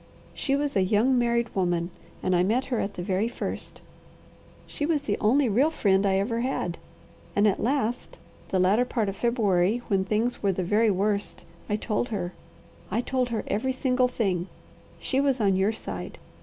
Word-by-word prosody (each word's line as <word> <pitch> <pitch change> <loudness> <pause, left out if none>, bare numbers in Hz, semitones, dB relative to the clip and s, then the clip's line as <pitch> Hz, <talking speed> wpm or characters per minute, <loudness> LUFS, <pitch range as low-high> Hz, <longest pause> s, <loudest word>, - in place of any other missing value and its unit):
She 275 - 0
was 285 0 -1
a 195 - +4
young 215 +7 +3
married 235 -1 +1
woman 175 -2 0 0.3
and 185 - +2
I 175 - +4
met 225 +8 +1
her 235 - +1
at 200 0 -3
the 175 - -4
very 190 +4 0
first. 235 - -5 0.8
She 295 - -6
was 295 -1 +1
the - - 0
only 260 +6 +4
real 250 +8 +3
friend 200 -9 +2
I 190 0 +2
ever 230 +4 0
had, 235 -9 -2 0.6
and 205 +1 +4
at 200 - +1
last, 245 -1 -1 0.3
the 190 - +1
latter 190 +6 +4
part 230 -4 -1
of 195 - -5
February, 215 -2 +1
when 195 -2 +2
things 220 +5 -1
were 195 -2 +2
the 185 - -2
very 215 +5 +3
worst, 200 +1 -1 0.2
I 210 - +1
told 215 +3 -1
her. 185 -5 -3 0.6
I 220 +5 0
told 255 -1 -1
her 225 -2 -2
every 260 +6 -1
single 255 -1 +2
thing. 195 -8 -1 0.5
She 270 0 0
was 275 -2 +1
on 200 -3 +3
your 190 +3 +2
side. 225 - -6
215 Hz, 185 wpm, -26 LUFS, 195-245 Hz, 0.8 s, a